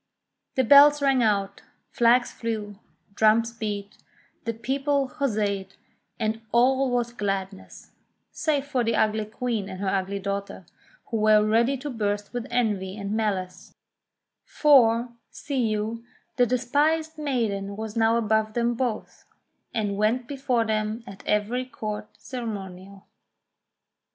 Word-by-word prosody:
The 260 - +3
bells 290 +4 +8
rang 270 -3 +3
out, 200 -3 0 0.3
flags 240 +1 +3
flew, 210 -3 -5 0.3
drums 220 +2 +3
beat, 205 -3 -5 0.5
the 230 - -1
people 270 +4 0
huzzaed, 205 -8 -2 0.4
and 220 0 -1
all 260 +3 +3
was 240 -1 -1
gladness, 195 -3 -5 0.4
save 290 -3 -1
for 265 -4 0
the 230 0 0
ugly 215 0 +1
Queen 215 -2 -3
and 185 -1 -7
her 195 -1 -1
ugly 195 +1 -1
daughter, 200 0 -4 0.5
who 225 - 0
were 215 0 +4
ready 235 +5 +2
to 290 +3 -6
burst 205 -2 -2
with 245 0 -4
envy 210 -5 -1
and 200 -1 -5
malice; 200 -4 -3 0.7
for, 245 -5 +4 0.2
see 265 -5 -2
you, 215 +2 -2 0.3
the 245 -2 +3
despised 300 +6 0
maiden 215 -9 -2
was 220 -1 -6
now 225 0 +3
above 220 -1 0
them 240 0 +1
both, 235 -2 -4 0.5
and 205 -3 -2
went 230 +4 +1
before 260 -4 0
them 215 +1 -2
at 195 -4 -11
every 210 +5 0
Court 215 -4 -6
ceremonial. 200 -5 -7
225 Hz, 130 wpm, -25 LUFS, 205-250 Hz, 0.7 s, bells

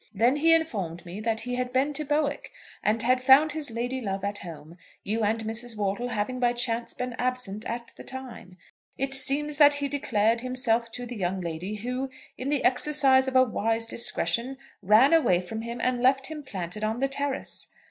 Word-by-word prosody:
Then 245 +5 +3
he 325 +3 +4
informed 205 - 0
me 180 +4 -7
that 225 0 -1
he 250 +2 -4
had 250 0 -2
been 270 +3 +1
to 305 - -3
Bowick, 295 0 -1 0.3
and 220 +2 0
had 255 +1 +2
found 275 +4 +6
his 300 -2 -3
lady 245 +3 -3
love 195 -3 -3
at 205 0 -2
home, 165 -1 -10 0.2
you 220 +3 -2
and 220 +1 0
Mrs. 225 +1 -2
Wortle 205 +4 -2
having 245 +3 -2
by 245 -1 +2
chance 240 -1 -2
been 250 0 -4
absent 250 -5 -2
at 235 0 -5
the - - -10
time. 255 -8 -9 0.4
It 270 0 -1
seems 280 +2 +3
that 290 -1 +7
he 285 0 -1
declared 230 -5 +1
himself 240 -2 0
to 245 - -4
the 245 0 -7
young 185 0 -2
lady, 175 +4 -4
who, 250 +5 -4 0.3
in 260 - -4
the 290 -2 0
exercise 265 0 +4
of 260 - -3
a 255 - +7
wise 225 -1 -1
discretion, 235 +2 -1 0.2
ran 215 - +5
away 240 - +4
from 200 +5 -6
him 235 +1 -6
and 250 -1 0
left 265 +3 +2
him 305 -1 -6
planted 200 -5 -6
on 220 +1 -1
the 270 +2 +1
terrace. 275 0 -4
245 Hz, 200 wpm, -26 LUFS, 215-270 Hz, 0.4 s, that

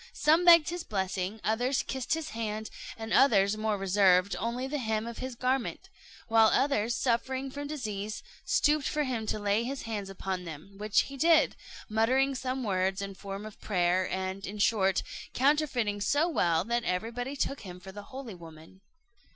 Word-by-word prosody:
Some 320 +4 +3
begged 335 -2 +8
his 350 0 -4
blessing, 190 +1 -3
others 245 +5 +1
kissed 265 +3 -2
his 320 -1 -5
hand, 220 -1 -4 0.3
and 225 0 -5
others, 205 -6 +5
more 215 -1 -1
reserved, 190 -1 +3
only 235 +4 -2
the 290 +2 -3
hem 220 -2 -1
of 235 0 -7
his 260 -1 -5
garment; 260 +9 -2 0.4
while 225 -1 +5
others, 240 -3 +2
suffering 260 +2 -1
from 285 +1 -5
disease, 215 -8 -4 0.2
stooped 295 -1 +2
for 300 -1 0
him 240 -5 -3
to - - -1
lay 205 +2 +1
his 270 +3 -4
hands 210 -4 -4
upon 190 -1 -4
them; 165 +3 -9
which 210 0 +3
he 275 - -7
did, 320 +2 +4 0.3
muttering 255 +5 +2
some 260 0 -3
words 190 -2 0
in 200 0 -4
form 195 +1 -7
of 215 - -11
prayer, 180 -1 +1
and, 190 +1 -3
in 205 +2 -6
short, 195 -3 +2 0.3
counterfeiting 255 -7 +1
so 290 +10 +2
well, 170 - +2
that 235 +3 -1
everybody 235 +8 -3
took 275 0 -2
him 180 -2 -9
for 190 +1 -10
the 205 +2 -8
holy 260 -5 -7
woman. 165 +1 -14
220 Hz, 175 wpm, -29 LUFS, 195-265 Hz, 0.4 s, begged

